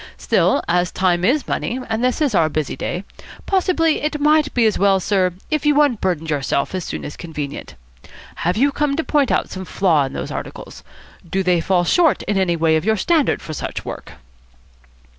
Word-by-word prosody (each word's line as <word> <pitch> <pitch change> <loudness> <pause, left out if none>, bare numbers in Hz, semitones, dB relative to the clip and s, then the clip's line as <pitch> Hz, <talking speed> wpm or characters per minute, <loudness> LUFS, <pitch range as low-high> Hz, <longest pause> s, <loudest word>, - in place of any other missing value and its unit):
Still, - - +2
as 175 +1 +1
time 180 -2 +1
is 270 +9 +1
money, 250 - -2
and 225 +1 -2
this 255 +4 0
is 280 -6 0
our 160 -5 +3
busy 155 -2 -2
day, 180 - -4 0.4
possibly 360 -4 +1
it 300 0 -2
might 300 0 +3
be 240 -2 +3
as 215 - +1
well, 195 0 +4
sir, 185 -1 +1 0.2
if 305 -2 0
you 295 -1 +3
unburdened 190 - +1
yourself 140 +1 -1
as 185 -2 -3
soon - - -5
as 145 - -7
convenient. 150 -4 -7 0.6
Have 175 +4 -1
you 280 +4 +3
come 290 0 0
to 325 - -1
point 290 -5 +1
out - - 0
some 190 - -6
flaw 170 -6 +1
in 135 - -7
those - - -5
articles? - - -8 0.5
Do 190 +2 0
they 180 -2 +2
fall 180 0 +1
short 325 - +3
in 205 - -2
any 185 -3 +1
way 160 -1 +2
of 155 - -3
your 220 +2 +1
standard 315 - +1
for 155 - -6
such - - -5
work?" - - -8
195 Hz, 200 wpm, -20 LUFS, 175-290 Hz, 0.6 s, well